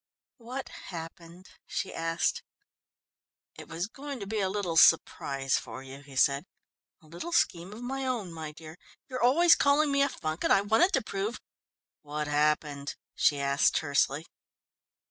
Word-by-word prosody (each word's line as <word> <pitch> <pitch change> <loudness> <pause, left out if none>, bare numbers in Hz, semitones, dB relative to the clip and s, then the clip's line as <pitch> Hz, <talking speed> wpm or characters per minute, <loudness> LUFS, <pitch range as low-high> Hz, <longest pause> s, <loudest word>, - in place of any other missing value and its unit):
"What 255 +3 -6
happened?" 170 +1 -10 0.2
she - - -3
asked. 165 0 -1 1.1
"It - - -11
was 165 +2 -3
going 275 +4 -7
to 200 - -5
be 215 +2 -2
a 190 -2 +1
little 190 -4 -2
surprise 135 -4 +4
for 130 - -9
you," 135 +1 -10
he 140 -1 -14
said. 140 +5 +3 0.6
"A - - -19
little 170 - -7
scheme 180 - +1
of 220 +3 -9
my 265 +1 -3
own, 220 -9 -3
my 160 -2 -6
dear; 160 +2 -12 0.3
you're 255 - -3
always 310 +8 +6
calling 285 +1 +3
me 280 0 +2
a 280 - +3
funk, 155 -8 -4
and - - +2
I 195 - +6
wanted 220 - +3
to 265 - +2
prove 200 +3 -3 0.3
" - - -83
"What 150 +1 -4
happened?" 150 -1 0 0.2
she 145 - +2
asked 140 +1 +2
tersely. 145 0 +1
170 Hz, 165 wpm, -29 LUFS, 150-240 Hz, 1.1 s, always